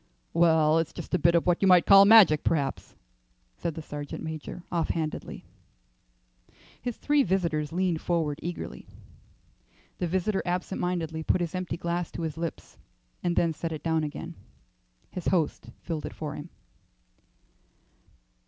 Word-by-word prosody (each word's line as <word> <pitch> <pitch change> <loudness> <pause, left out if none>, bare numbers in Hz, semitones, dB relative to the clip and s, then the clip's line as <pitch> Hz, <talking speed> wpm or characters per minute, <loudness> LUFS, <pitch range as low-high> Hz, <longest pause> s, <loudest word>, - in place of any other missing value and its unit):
"Well, 160 -2 +4
it's 165 - -2
just - - -8
a 180 - +3
bit 170 +2 +4
of 170 - +2
what 175 -1 +2
you 195 - +4
might 180 -2 +6
call 195 0 +8
magic, 200 -8 +7
perhaps," 140 -4 -1 0.6
said 165 -3 -4
the 160 - -6
sergeant 145 -1 -6
major, 160 +2 -6
offhandedly. 165 -2 -3 1.4
His 245 -2 -4
three 290 -1 +2
listeners 170 - 0
leaned 175 -2 0
forward 160 -4 -1
eagerly. 175 +1 -6 1.1
The 180 - 0
visitor 190 +3 0
absent 180 +1 -2
mindedly 165 -3 -2
put 170 - +1
his 170 -2 -2
empty 185 -2 -3
glass 170 0 -2
to 170 - -5
his 160 -1 -3
lips 165 0 -6 0.4
and 175 -1 0
then 165 -1 +2
set 165 +2 -4
it 155 - -6
down 160 -1 +1
again. 150 - -5 0.8
His 180 - -5
host 160 -9 0
filled 160 -3 -4
it - - -10
for 150 -2 -5
him. 150 +3 -8
170 Hz, 150 wpm, -27 LUFS, 160-180 Hz, 1.4 s, call